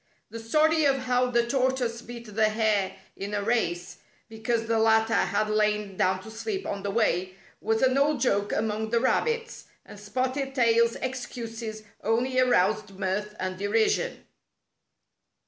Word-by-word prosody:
The 230 Hz, -, -6 dB
story 310 Hz, +7 st, +2 dB
of 275 Hz, -1 st, +3 dB
how 250 Hz, 0 st, +1 dB
the 235 Hz, -1 st, +2 dB
tortoise 255 Hz, -2 st, 0 dB
beat 235 Hz, -3 st, -10 dB
the 215 Hz, +1 st, +3 dB
hare 210 Hz, -3 st, +1 dB, 0.2 s
in 200 Hz, +1 st, -4 dB
a 205 Hz, -, -1 dB
race, 200 Hz, -6 st, -1 dB, 0.3 s
because 225 Hz, +1 st, -2 dB
the 225 Hz, 0 st, +1 dB
latter 220 Hz, 0 st, +3 dB
had 215 Hz, -1 st, +1 dB
lain 210 Hz, -2 st, 0 dB
down 185 Hz, 0 st, +1 dB
to 220 Hz, -, -10 dB
sleep 390 Hz, -, -4 dB
on 200 Hz, -, -3 dB
the 200 Hz, -, -3 dB
way, 185 Hz, -3 st, 0 dB, 0.3 s
was 220 Hz, +2 st, 0 dB
an 260 Hz, 0 st, +4 dB
old 290 Hz, +1 st, +2 dB
joke 205 Hz, -5 st, +1 dB
among 220 Hz, 0 st, -1 dB
the 235 Hz, +1 st, +2 dB
rabbits, 465 Hz, -, -1 dB, 0.2 s
and 205 Hz, -, -12 dB
Spotted 260 Hz, +6 st, -2 dB
Tail's 235 Hz, -2 st, +3 dB
excuses 230 Hz, -4 st, -5 dB, 0.2 s
only 250 Hz, +4 st, +1 dB
aroused 215 Hz, -4 st, +2 dB
mirth 205 Hz, +2 st, -2 dB
and 185 Hz, 0 st, -3 dB
derision. 220 Hz, -, 0 dB
225 Hz, 150 wpm, -27 LUFS, 210-250 Hz, 0.3 s, an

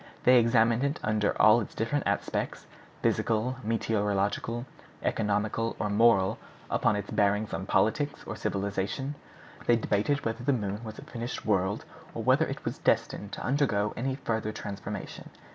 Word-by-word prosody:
They 125 Hz, 0 st, +7 dB
examined 115 Hz, +1 st, +3 dB
it 140 Hz, +1 st, 0 dB
under 105 Hz, -1 st, +1 dB
all 110 Hz, +2 st, +7 dB
its 105 Hz, -, -7 dB
different 130 Hz, +6 st, -1 dB
aspects, -, -, -2 dB, 0.4 s
physical, 115 Hz, +3 st, +1 dB
meteorological, 110 Hz, +1 st, 0 dB, 0.4 s
economical, 110 Hz, +2 st, 0 dB
or 105 Hz, -, -1 dB
moral, 105 Hz, -3 st, +4 dB, 0.3 s
up -, -, 0 dB
to 105 Hz, -, +3 dB
its 105 Hz, -, -4 dB
bearings 105 Hz, +1 st, +1 dB
on 95 Hz, -, -3 dB
politics 145 Hz, +9 st, +1 dB
or -, -, -5 dB
civilization. 100 Hz, +8 st, -2 dB, 0.5 s
They 120 Hz, -, +6 dB
debated 115 Hz, +6 st, 0 dB
whether 115 Hz, +2 st, -2 dB
the 140 Hz, +2 st, +3 dB
moon 105 Hz, -2 st, -3 dB
was 110 Hz, -1 st, -7 dB
a -, -, -9 dB
finished 120 Hz, 0 st, -5 dB
world, 95 Hz, -1 st, +1 dB, 0.3 s
or -, -, -3 dB
whether -, -, +4 dB
it -, -, -6 dB
was -, -, -3 dB
destined 100 Hz, 0 st, 0 dB
to -, -, -5 dB
undergo 125 Hz, -7 st, +1 dB
any 130 Hz, +2 st, -1 dB
further 110 Hz, -5 st, -2 dB
transformation. 100 Hz, -2 st, -6 dB
110 Hz, 155 wpm, -29 LUFS, 105-120 Hz, 0.5 s, They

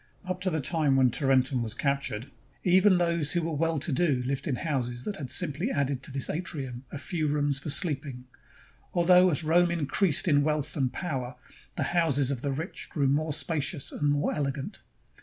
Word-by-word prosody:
Up 185 Hz, 0 st, -4 dB
to 185 Hz, -, +1 dB
the 160 Hz, -3 st, -1 dB
time 150 Hz, -1 st, +2 dB
when 130 Hz, -2 st, +4 dB
Taren 135 Hz, -1 st, +3 dB
tum 130 Hz, -3 st, -1 dB
was 115 Hz, 0 st, -3 dB
captured, 140 Hz, -4 st, -2 dB, 0.3 s
even 185 Hz, +1 st, +5 dB
those 170 Hz, -4 st, +1 dB
who 175 Hz, -1 st, 0 dB
were 165 Hz, 0 st, -2 dB
well 165 Hz, +2 st, 0 dB
to 150 Hz, -, -1 dB
do 135 Hz, -3 st, +1 dB
Hved 135 Hz, +2 st, -2 dB
in 135 Hz, -, 0 dB
houses 125 Hz, -4 st, -3 dB
that 205 Hz, -, -4 dB
had 135 Hz, -4 st, -6 dB
simply 170 Hz, -, 0 dB
added 140 Hz, -, -1 dB
to -, -, -4 dB
this 135 Hz, 0 st, -1 dB
atrium 135 Hz, -6 st, -4 dB
a -, -, -5 dB
few 155 Hz, +1 st, -2 dB
rooms 145 Hz, -1 st, 0 dB
for 150 Hz, -, -6 dB
sleeping, 140 Hz, -5 st, -2 dB, 0.7 s
although 180 Hz, +1 st, +6 dB
as 160 Hz, -1 st, +1 dB
Rome 175 Hz, +3 st, +4 dB
increased 170 Hz, +1 st, 0 dB
in 145 Hz, -3 st, +4 dB
wealth 150 Hz, -1 st, -1 dB
and 135 Hz, -4 st, 0 dB
power, 130 Hz, -8 st, -4 dB, 0.4 s
the -, -, -1 dB
houses 145 Hz, -6 st, +2 dB
of 130 Hz, -4 st, -3 dB
the 140 Hz, -, -1 dB
rich 160 Hz, +6 st, -5 dB
grew 140 Hz, -3 st, +1 dB
more 155 Hz, +3 st, +1 dB
spacious 150 Hz, 0 st, -1 dB
and 145 Hz, -, 0 dB
more 145 Hz, 0 st, +1 dB
elegant. 140 Hz, -2 st, -3 dB
145 Hz, 195 wpm, -28 LUFS, 135-170 Hz, 0.7 s, although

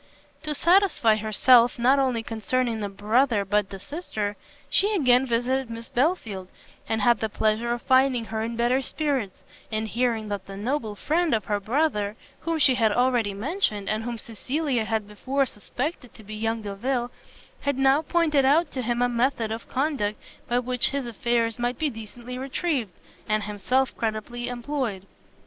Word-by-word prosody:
To 305 Hz, -1 st, -2 dB
satisfy 340 Hz, -, +4 dB
herself 230 Hz, +3 st, +4 dB
not 255 Hz, +4 st, +4 dB
only 255 Hz, -4 st, +1 dB
concerning 225 Hz, +2 st, -1 dB
the 205 Hz, -1 st, -3 dB
brother 210 Hz, +2 st, +2 dB
but 205 Hz, 0 st, +1 dB
the 195 Hz, -, -8 dB
sister, 215 Hz, -, -4 dB, 0.3 s
she 415 Hz, +2 st, +3 dB
again 255 Hz, -6 st, +4 dB
visited 245 Hz, +2 st, 0 dB
Miss 230 Hz, 0 st, -7 dB
Belfield, 240 Hz, -, 0 dB, 0.4 s
and 220 Hz, -2 st, 0 dB
had 240 Hz, -1 st, +4 dB
the 220 Hz, -, -1 dB
pleasure 220 Hz, +3 st, 0 dB
of 240 Hz, 0 st, -2 dB
finding 260 Hz, -2 st, +3 dB
her 220 Hz, 0 st, -3 dB
in 230 Hz, +1 st, -3 dB
better 240 Hz, +3 st, +2 dB
spirits, 270 Hz, -8 st, -2 dB, 0.3 s
and 220 Hz, 0 st, -1 dB
hearing 230 Hz, -1 st, 0 dB
that 200 Hz, -2 st, -4 dB
the 195 Hz, 0 st, -8 dB
noble 225 Hz, -1 st, -2 dB
friend 315 Hz, -, +1 dB
of 215 Hz, -4 st, -2 dB
her 205 Hz, -1 st, 0 dB
brother, 215 Hz, -2 st, 0 dB, 0.2 s
whom 330 Hz, 0 st, -1 dB
she 285 Hz, -4 st, +5 dB
had 225 Hz, -4 st, +2 dB
already 240 Hz, -3 st, +2 dB
mentioned, 215 Hz, -, -1 dB
and 215 Hz, +1 st, 0 dB
whom 240 Hz, 0 st, -4 dB
Cecilia 250 Hz, +2 st, -2 dB
had 220 Hz, -2 st, -1 dB
before 265 Hz, +7 st, -1 dB
suspected 250 Hz, -, -5 dB
to 220 Hz, -, -13 dB
be 215 Hz, +1 st, -9 dB
young 225 Hz, +1 st, -2 dB
Delvile, 240 Hz, +5 st, -2 dB, 0.5 s
had 280 Hz, -2 st, -1 dB
now 270 Hz, +2 st, +4 dB
pointed 315 Hz, -3 st, +2 dB
out 290 Hz, +4 st, +3 dB
to 260 Hz, -, -3 dB
him 240 Hz, 0 st, 0 dB
a -, -, +4 dB
method 240 Hz, -2 st, 0 dB
of 225 Hz, +1 st, -6 dB
conduct 265 Hz, -7 st, -1 dB, 0.3 s
by 240 Hz, -, +1 dB
which 250 Hz, 0 st, +1 dB
his 280 Hz, -2 st, -2 dB
affairs 235 Hz, 0 st, 0 dB
might 240 Hz, 0 st, -1 dB
be 305 Hz, -2 st, 0 dB
decently 240 Hz, +3 st, -8 dB
retrieved, 270 Hz, -, -1 dB, 0.4 s
and 215 Hz, 0 st, +1 dB
himself 210 Hz, +6 st, 0 dB
creditably 230 Hz, +2 st, -3 dB
employed. 245 Hz, -5 st, -3 dB
240 Hz, 170 wpm, -25 LUFS, 215-265 Hz, 0.5 s, she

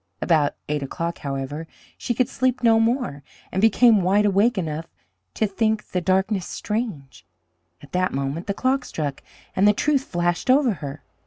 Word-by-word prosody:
About 155 Hz, -4 st, +2 dB
eight 150 Hz, 0 st, -1 dB
o'clock, 170 Hz, +5 st, -4 dB
however, 140 Hz, +3 st, -4 dB, 0.3 s
she 240 Hz, -, -3 dB
could 255 Hz, 0 st, +2 dB
sleep 255 Hz, -1 st, -1 dB
no 225 Hz, -1 st, +5 dB
more, 230 Hz, -, 0 dB, 0.3 s
and 190 Hz, -, -1 dB
became 225 Hz, 0 st, +5 dB
wide 195 Hz, +4 st, +3 dB
awake 205 Hz, +4 st, +3 dB
enough 160 Hz, -2 st, -3 dB, 0.5 s
to -, -, +1 dB
think 215 Hz, +1 st, -1 dB
the 180 Hz, -, 0 dB
darkness 190 Hz, +1 st, +1 dB
strange. 205 Hz, -, -4 dB, 0.6 s
At 145 Hz, -, -14 dB
that 185 Hz, 0 st, +1 dB
moment 140 Hz, +6 st, -3 dB
the 200 Hz, -, -1 dB
clock 260 Hz, +2 st, +1 dB
struck, 145 Hz, -, -4 dB, 0.3 s
and 195 Hz, +2 st, +4 dB
the 210 Hz, -, +6 dB
truth 280 Hz, +4 st, +1 dB
flashed 175 Hz, +5 st, -1 dB
over 260 Hz, -3 st, +4 dB
her. 145 Hz, 0 st, -7 dB
190 Hz, 165 wpm, -23 LUFS, 155-225 Hz, 0.6 s, the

